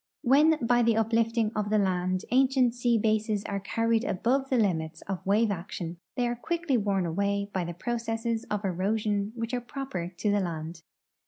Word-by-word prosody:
\\'hen 300 +5 +5
by 240 +1 +4
the 230 -1 +3
uplifting 225 0 +1
of 210 -1 -1
the 215 - +3
land 185 -2 0
ancient 260 -1 +3
sea 240 -1 +2
bases 215 -1 +1
are 200 -1 -2
carried 230 +3 0
above 265 +4 0
the 260 - +2
limits 160 -7 0
of 195 -2 -5
Avave 210 +3 +3
action 175 -2 -5 0.2
they 245 -2 +1
are 240 - -1
quickly 330 +3 -1
Avorn 200 -4 +1
aAvay 200 +1 0
hy 185 - +1
the 170 0 -6
})roce.sses 230 +1 -2
of 210 -1 -2
erosion 205 +2 0
Avhich 230 +1 -3
are 245 - 0
proper 240 -8 -5
to 205 +4 +1
the 205 - +2
land. 165 -2 -4
215 Hz, 180 wpm, -28 LUFS, 195-240 Hz, 0.2 s, hen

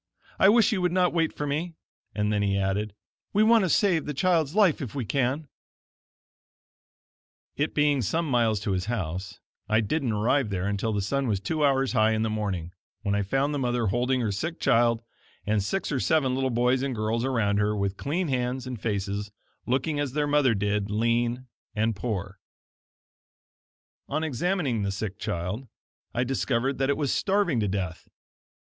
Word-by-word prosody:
I 190 - +7
wish 225 +1 +5
you 200 -4 0
would 180 -1 +1
not 180 -1 +2
wait 165 -2 +1
for 145 - -4
me"; 160 +4 -2 0.4
and 105 0 0
then 105 - +1
he 100 -1 +1
added: 100 +1 -1 0.4
"We 210 - +4
want 225 -2 +5
to - - -1
save 175 -5 +2
the 150 - -3
child's 165 -1 +1
life 200 -7 +4
if 130 -3 -6
we 130 -4 -2
can." 140 +5 0 2.1
It 145 +2 -1
being 145 -2 +3
some 160 - -1
miles 115 -5 +2
to 105 -1 -2
his 90 -1 -1
house, 95 -3 -4 0.3
I 110 +1 +4
didn't 125 +3 0
arrive 115 +4 +1
there 95 -2 -2
until 100 +2 -1
the 100 -2 -1
sun 140 +6 -1
was 105 -4 0
two 150 +10 -1
hours 135 -2 +2
high 110 -2 +3
in 110 0 0
the 110 - -1
morning, 95 -6 -3 0.3
when 100 -2 0
I 100 - +1
found 135 +9 0
the 145 - -1
mother 120 -2 0
holding 125 +5 +1
her 110 -3 0
sick 165 - -3
child, 115 0 +3 0.4
and 105 0 +1
six 195 - -2
or 135 - 0
seven 140 -3 +2
little 130 0 0
boys 125 +2 +2
and 135 -2 -2
girls 110 +2 -1
around 110 -6 +1
her, 105 +1 +1
with 100 -1 -1
clean 160 - -2
hands 125 -1 -1
and 125 -5 -6
faces, 100 -1 -2 0.4
looking 135 +4 0
as 145 -3 -2
their 150 0 +1
mother 145 -5 +3
did, 105 0 -1
lean 115 +3 0 0.3
and 110 +1 +1
poor. 100 -3 -4 1.7
On 155 +3 -1
examining 155 - 0
the 100 -1 -1
sick 100 0 -5
child, 90 +10 -3 0.4
I 120 - 0
discovered 130 0 -1
that 135 0 +1
it 140 - +2
was 145 -4 0
starving 195 - +1
to 105 - 0
death! 95 -4 -4
120 Hz, 185 wpm, -26 LUFS, 105-145 Hz, 2.1 s, I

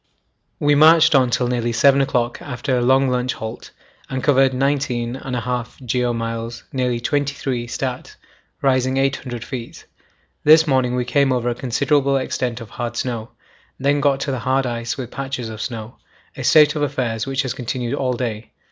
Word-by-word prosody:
We 145 0 +3
marched 160 +2 +6
on 130 -3 +4
till 125 +1 +1
nearly 120 -1 -1
7 140 +4 +4
o'clock 125 -3 -1
after 130 0 -2
a 125 - +1
long 130 +2 +4
lunch 125 0 0
halt, 110 0 -7 0.4
and 130 -1 -3
covered 135 -2 +4
19 130 -2 -1
1/2 125 -1 -4
geo. 125 0 0
miles, 115 0 -4
nearly 125 -2 0
23 135 -2 -2
(stat.), 125 +1 -4 0.5
rising 130 -1 +2
800 135 -3 -1
feet. 120 -3 -7 0.6
This 155 +1 +7
morning 130 -4 +1
we 125 -1 -1
came 140 +2 +2
over 120 -1 0
a - - 0
considerable 135 +3 +1
extent 125 -2 -2
of 115 - -10
hard 120 0 -4
snow, 115 -3 -3 0.5
then 140 +2 +2
got 140 -1 +2
to 135 -3 -2
hard 130 +3 +1
ice 120 -1 -3
with 125 -3 -6
patches 135 -3 -4
of 110 0 -7
snow; 115 -2 -6 0.4
a - - -6
state 150 -1 +5
of 150 - -2
affairs 120 -5 -1
which 135 +1 0
has 130 -2 -2
continued 125 -1 -3
all 130 -3 0
day. 115 -3 -4
125 Hz, 170 wpm, -20 LUFS, 120-135 Hz, 0.6 s, This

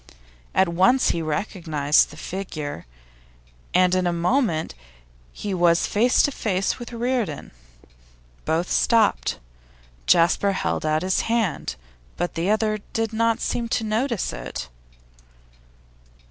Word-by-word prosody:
At 190 - +4
once 190 +10 +3
he 170 - -2
recognised 155 -3 +1
the 150 - -13
figure, 155 - -6 0.8
and 180 0 +3
in 185 -1 +2
a - - +1
moment 170 - 0 0.6
he 200 - -5
was 175 -2 +3
face 235 +4 +3
to 285 - +2
face 195 -6 -1
with 240 - -8
Reardon. 235 - -2 0.9
Both 165 +3 -1
stopped. 225 -3 +2 0.7
Jasper 180 +4 +4
held 155 - -2
out 155 +1 +1
his 185 0 +1
hand, 225 -7 -1 0.4
but 175 - -2
the 170 +3 -1
other 215 0 +1
did 225 0 -1
not 230 0 +1
seem 235 -1 -2
to 225 - 0
notice 225 +1 -1
it. - - -6
190 Hz, 120 wpm, -23 LUFS, 170-225 Hz, 0.9 s, At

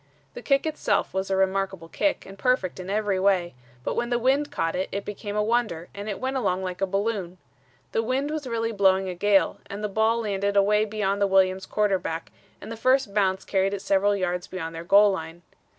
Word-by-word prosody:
The - - -8
kick 275 +3 +2
itself 315 -1 0
was 190 0 -2
a 195 - +1
remarkable 190 -2 0
kick 295 - -1
and 195 - -10
perfect 195 -3 0
in 185 +1 -7
every 205 -2 0
way, 185 -4 +2 0.3
but - - -1
when 240 - -1
the 240 - +2
wind 270 +4 +2
caught 165 -12 -1
it 185 +1 -2
it 200 +1 -4
became 205 0 -6
a 210 - +2
wonder 215 -7 -1
and 200 +1 -6
it 200 - -4
went 265 +1 -2
along 190 -6 0
like 180 0 -5
a 195 - +2
balloon. 195 -2 -2 0.5
The 225 - +1
wind 260 +5 -1
was 305 -3 -4
really 230 -1 -1
blowing 190 -2 +3
a - - -3
gale 200 +2 +2
and 200 +1 -6
the - - +1
ball 220 +3 +1
landed 200 -1 -1
away 210 +2 +4
beyond 205 -2 -1
the 200 - +4
Williams' 190 0 +2
quarterback 190 -6 -1 0.3
and - - -9
the 230 - -6
first 255 -2 +2
bounce 190 -2 +1
carried 195 0 +1
it 195 - -7
several 200 +1 +2
yards 180 -2 -2
beyond 165 -3 -5
their 165 0 -6
goal 200 +3 +6
line. 170 -2 -6
200 Hz, 215 wpm, -25 LUFS, 190-220 Hz, 0.5 s, goal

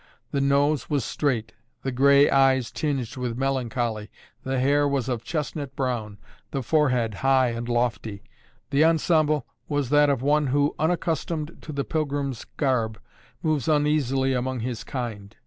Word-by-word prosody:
The 140 - 0
nose 140 0 +2
was 140 -5 0
straight, 120 -7 -1 0.3
the 135 - -1
grey 140 +3 +5
eyes 135 -3 +3
tinged 135 -6 -2
with 125 -2 -3
melancholy, 120 -5 -1 0.3
the 130 0 -2
hair 145 +2 +3
was 140 -3 -1
of 120 -3 -2
chestnut 145 -2 -4
brown, 120 -6 -2 0.3
the 135 -2 -3
forehead 125 -5 +2
high 130 -1 +4
and 120 +1 -4
lofty. 120 -4 -1 0.5
The 140 +3 +4
ensemble 155 -3 +2 0.2
was 145 -3 -1
that 145 0 +5
of 135 -3 0
one 150 +1 +3
who, 145 +2 +2
unaccustomed 165 -1 -1
to 155 - -8
the 140 -1 -2
pilgrim's 140 -5 -2
garb, 115 - 0 0.4
moves 155 -5 0
uneasily 145 -3 +2
among 130 -1 -2
his 120 0 -4
kind. 110 -5 -6
135 Hz, 145 wpm, -25 LUFS, 120-145 Hz, 0.5 s, grey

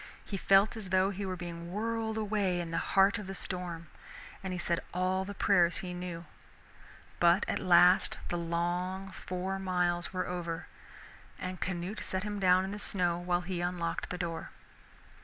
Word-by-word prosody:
He 200 - -4
felt 195 +3 +4
as 215 -4 -6
though 190 +1 +3
he 200 0 -4
were 185 - -2
being 170 -1 -7
whirled 220 +2 -2
away 205 -4 0
in 170 -1 -4
the 165 - 0
heart 195 +1 +3
of 205 - -7
the 195 - -5
storm, 175 -3 -3 0.6
and 190 -1 -4
he 180 - -2
said 170 -1 +1 0.2
all 185 +1 +1
the 200 +1 -6
prayers 180 -4 +4
he 180 -1 -5
knew. 175 -1 -5 0.9
But 175 +3 +5
at - - 0
last 180 +1 +5
the 175 - -1
long 175 +3 -2
four 185 +1 -4
miles 180 -2 0
were 185 -1 -1
over, 175 -1 -3 0.7
and 185 -1 -5
Canute 185 +3 -3
set 190 0 -1
him 210 -1 -3
down 185 0 +4
in 195 - -4
the 205 - -5
snow 175 -4 +1
while 175 0 0
he 175 -1 -3
unlocked 175 -1 -2
the 180 - -3
door. 170 -2 -4
180 Hz, 175 wpm, -31 LUFS, 175-195 Hz, 0.9 s, But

